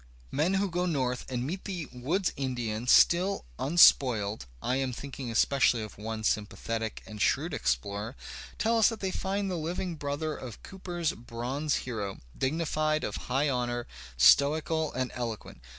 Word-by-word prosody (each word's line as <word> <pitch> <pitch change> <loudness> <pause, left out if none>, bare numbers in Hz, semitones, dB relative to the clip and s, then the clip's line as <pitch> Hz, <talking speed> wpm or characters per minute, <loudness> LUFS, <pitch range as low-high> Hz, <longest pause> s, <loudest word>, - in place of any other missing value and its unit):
Men 175 +6 +1
who 200 +1 +2
go 180 0 -1
north 130 -7 -1
and 125 -1 -2
meet 180 +7 -4
the 180 -6 -4
woods 160 +10 -1
Indian 120 -4 -3
still 180 +9 +5
un 155 +6 -2
spoiled 110 - +5
(I 125 - 0
am 135 -2 -1
thinking 135 0 -6
especially 120 0 +3
of 110 - -9
one 110 +1 -4
sympathetic 110 +2 -2
and 105 -1 -8
shrewd - - +1
explorer) 100 - -2 0.4
tell 230 +1 +2
us 220 - +6
that 225 -2 -6
they 190 -1 -2
find 195 +1 -2
the 180 - -2
Uving 170 +1 -3
brother 145 +2 -2
of 125 -4 -9
Cooper's 175 -4 -3
bronze 125 +6 -3
hero, 105 -6 -4 0.2
dignified, 155 +1 0
of 105 - -3
high 135 +4 +2
honour, 120 -2 -1 0.3
stoical 150 - +4
and 130 0 -2
eloquent. 115 - -5
135 Hz, 155 wpm, -29 LUFS, 115-165 Hz, 0.4 s, us